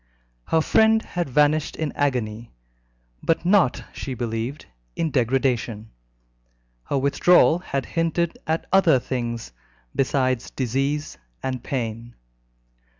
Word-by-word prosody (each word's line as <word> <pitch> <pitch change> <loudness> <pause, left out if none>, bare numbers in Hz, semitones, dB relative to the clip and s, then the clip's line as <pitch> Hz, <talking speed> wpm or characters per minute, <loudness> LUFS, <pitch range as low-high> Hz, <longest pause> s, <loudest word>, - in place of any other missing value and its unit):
Her 160 - +2
friend 220 +6 +4
had 175 -5 -3
vanished 150 +3 +2
in 155 -2 -2
agony, 115 - -2 0.7
but 165 +1 0
not, 185 -8 +3
she 130 - -5
believed, 115 +4 -4 0.3
in 160 - -1
degradation. 120 -4 0 0.9
Her 140 - -1
withdrawal 155 +5 +4
had 140 -7 -3
hinted 165 0 -1
at 160 +1 0
other 180 -7 +6
things 120 - -4 0.4
besides 130 -2 0
disease 135 - -2 0.2
and 130 -2 -3
pain. 115 -2 -4
135 Hz, 105 wpm, -23 LUFS, 120-160 Hz, 0.9 s, other